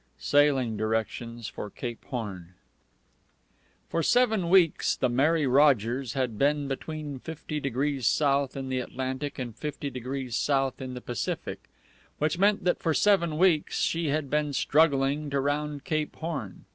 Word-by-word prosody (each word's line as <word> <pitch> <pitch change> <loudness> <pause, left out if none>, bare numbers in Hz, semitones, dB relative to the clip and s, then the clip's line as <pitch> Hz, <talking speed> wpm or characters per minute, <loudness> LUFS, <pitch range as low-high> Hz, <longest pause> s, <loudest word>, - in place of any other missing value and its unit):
_ - - -40
Sailing 135 -6 +2
directions 110 +1 -2
for 105 -2 -6
Cape 120 +2 -6
Horn. 95 -8 -6 1.3
For 165 - -1
seven 220 -2 +2
weeks 175 -4 +4
the 130 - 0
Mary 145 +5 +2
Rogers 130 -3 +3
had 125 -5 -2
been 145 0 +2
between 145 0 -5
50° 145 -3 -3
south 140 0 +2
in 135 -1 -4
the 130 0 0
Atlantic 130 +3 -4
and 120 -4 -5
50° 135 -3 -5
south 135 -1 0
in 130 -1 -5
the 125 - -6
Pacific, 120 -1 -4 0.5
which 155 +3 0
meant 200 0 +3
that 180 - +1
for 160 -2 0
seven 170 -7 +3
weeks 170 -4 +2
she 165 -1 0
had 145 0 0
been 150 +1 0
struggling 145 0 +2
to 140 0 0
round 145 +1 -2
Cape 155 -3 -2
Horn. 155 - -5
140 Hz, 145 wpm, -27 LUFS, 125-155 Hz, 1.3 s, weeks